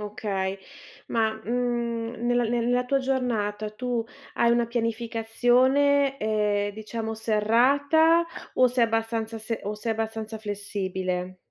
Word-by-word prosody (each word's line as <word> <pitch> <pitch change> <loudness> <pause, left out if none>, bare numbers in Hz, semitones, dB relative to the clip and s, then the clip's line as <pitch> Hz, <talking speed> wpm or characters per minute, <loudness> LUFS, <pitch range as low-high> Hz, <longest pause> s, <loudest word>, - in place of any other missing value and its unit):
okay. 200 -2 -3 0.5
Ma, 225 -1 +2
mhmm, 235 -1 -2
nel 245 -1 +2
nella 245 +1 +1
tua 275 +2 +2
giornata 230 -6 -1
tu 240 +2 -2 0.3
hai 235 - +3
una 235 0 +3
pianificazione, 245 +4 +2
ehm, 210 -2 0
diciamo 220 +1 -5
serrata 270 +10 +3 0.3
o 255 - +5
sei 245 -1 +3
abbastanza 225 0 -1
se 220 +1 -4
o 205 +1 -3
sei 225 +2 -2
abbastanza 220 0 -4
flessibile? 190 -3 -3
225 Hz, 115 wpm, -26 LUFS, 215-245 Hz, 0.5 s, o